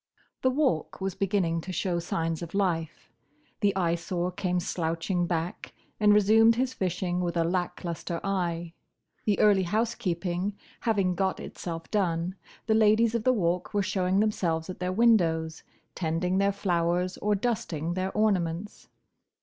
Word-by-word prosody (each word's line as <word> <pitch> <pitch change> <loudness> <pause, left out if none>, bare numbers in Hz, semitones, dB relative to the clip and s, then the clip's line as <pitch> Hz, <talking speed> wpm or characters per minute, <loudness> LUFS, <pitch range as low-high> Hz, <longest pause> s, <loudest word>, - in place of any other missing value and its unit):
The 260 - +3
Walk 260 - 0
was 195 -1 -2
beginning 190 -4 0
to 185 - -6
show 180 0 -1
signs 165 -1 -2
of 170 +2 -7
life. 165 -5 -1 0.5
The 200 -2 +2
Eyesore 175 0 -1
came 180 -1 -1
slouching 170 +1 -1
back, 170 0 -3 0.2
and 210 -1 +5
resumed 220 +2 +6
his 255 +2 0
fishing 180 -2 -1
with 175 -1 -1
a 165 - +3
lack 180 +1 -2
lustre 170 0 -4
eye. 175 -4 -2 0.5
The 210 -2 +2
early 205 -2 +5
housekeeping 185 -2 -1 0.2
having 200 -6 +1
got 190 +1 -1
itself 165 -2 -7
done, 175 -3 0 0.3
the 220 - +2
ladies 220 +1 +4
of 235 -2 -1
the 255 - +4
Walk 180 -5 -1
were 205 - +2
showing 190 0 +1
themselves 175 -5 0
at - - -10
their 180 0 -1
windows, 170 -7 +2 0.3
tending 180 +2 0
their 200 0 +3
flowers 180 -2 0
or 210 0 +1
dusting 175 -7 -2
their 185 +1 -2
ornaments. 195 -3 -1
185 Hz, 150 wpm, -28 LUFS, 170-205 Hz, 0.5 s, resumed